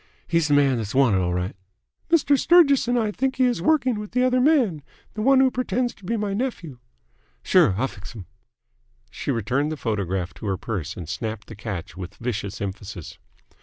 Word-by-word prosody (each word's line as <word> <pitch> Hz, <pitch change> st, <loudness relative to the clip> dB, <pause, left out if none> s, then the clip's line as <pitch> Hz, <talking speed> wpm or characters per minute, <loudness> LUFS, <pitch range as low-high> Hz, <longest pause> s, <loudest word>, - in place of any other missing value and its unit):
He's 165 Hz, -2 st, +1 dB
th' 145 Hz, -, +2 dB
man 140 Hz, -3 st, +4 dB
that's 110 Hz, -1 st, -4 dB
wanted 125 Hz, -8 st, +4 dB
'll 90 Hz, -1 st, 0 dB
right." 90 Hz, +2 st, -2 dB, 0.5 s
"Mr. 315 Hz, -3 st, +4 dB
Sturgis 280 Hz, -4 st, +5 dB
and 245 Hz, 0 st, +1 dB
I 220 Hz, -3 st, 0 dB
both -, -, -18 dB
think 265 Hz, 0 st, 0 dB
he 260 Hz, -, +2 dB
is 245 Hz, -1 st, +1 dB
working 265 Hz, -8 st, +2 dB
with 210 Hz, +1 st, -8 dB
the 250 Hz, +1 st, +2 dB
other 255 Hz, 0 st, +3 dB
man, 250 Hz, -, +3 dB, 0.3 s
the 215 Hz, -, -4 dB
one 270 Hz, +3 st, +5 dB
who 265 Hz, -1 st, +4 dB
pretends 250 Hz, -1 st, -1 dB
to -, -, -23 dB
be 230 Hz, +5 st, -1 dB
my 205 Hz, -2 st, -2 dB
nephew." 195 Hz, -, -4 dB, 0.6 s
"Sure. 95 Hz, -, +4 dB
I'll 130 Hz, +4 st, +1 dB
fix 105 Hz, 0 st, -11 dB
'm." 100 Hz, -5 st, -8 dB, 0.9 s
She -, -, -6 dB
returned 130 Hz, +5 st, 0 dB
the 155 Hz, -, -4 dB
photograph 95 Hz, -7 st, -2 dB
to 105 Hz, -, -8 dB
her 95 Hz, -1 st, -1 dB
purse 95 Hz, -5 st, -5 dB
and 85 Hz, -4 st, -7 dB
snapped 110 Hz, +4 st, -5 dB
the 110 Hz, -, -8 dB
catch 100 Hz, -4 st, -6 dB
with 90 Hz, 0 st, -8 dB
vicious 110 Hz, -4 st, -4 dB
emphasis. 100 Hz, -3 st, -7 dB
145 Hz, 205 wpm, -23 LUFS, -, 0.9 s, Sturgis